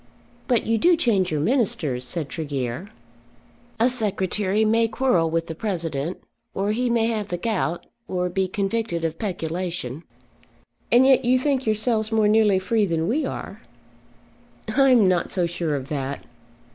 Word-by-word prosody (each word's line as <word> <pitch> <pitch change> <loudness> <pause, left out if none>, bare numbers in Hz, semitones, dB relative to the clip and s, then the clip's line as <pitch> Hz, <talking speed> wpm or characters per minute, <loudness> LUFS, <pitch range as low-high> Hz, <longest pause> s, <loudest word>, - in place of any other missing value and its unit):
"But 245 -3 +2
you 225 0 +1
do 345 +7 +4
change 200 - +1
your 150 -2 0
ministers," 155 - 0
said 155 +3 -3
Tregear. 140 0 -4 0.9
"A 230 - +4
secretary 210 -3 0
may 225 +1 +3
quarrel 220 -9 +1
with 165 0 -1
the 165 - -6
President, 165 -4 -3 0.4
or 200 +2 0
he 245 +3 0
may 230 -1 +2
have 220 -3 -1
the 175 - -3
gout, 175 -4 -2 0.2
or 180 -1 -1
be 190 +1 -1
convicted 195 -3 -2
of 165 0 -3
peculation." 170 - -4 0.9
"And 245 +2 +6
yet 265 -1 +5
you 250 +1 +3
think 265 -2 0
yourselves 220 0 0
more 220 -1 +3
nearly 210 -2 +4
free 205 +2 +1
than 165 -1 -1
we 275 +5 0
are." 200 - -7 1.1
"I 270 0 +5
am 235 -6 +5
not 180 -2 +1
so 180 -2 0
sure 170 -3 -2
of 135 0 -5
that. 140 -2 -4
195 Hz, 160 wpm, -23 LUFS, 165-230 Hz, 1.1 s, And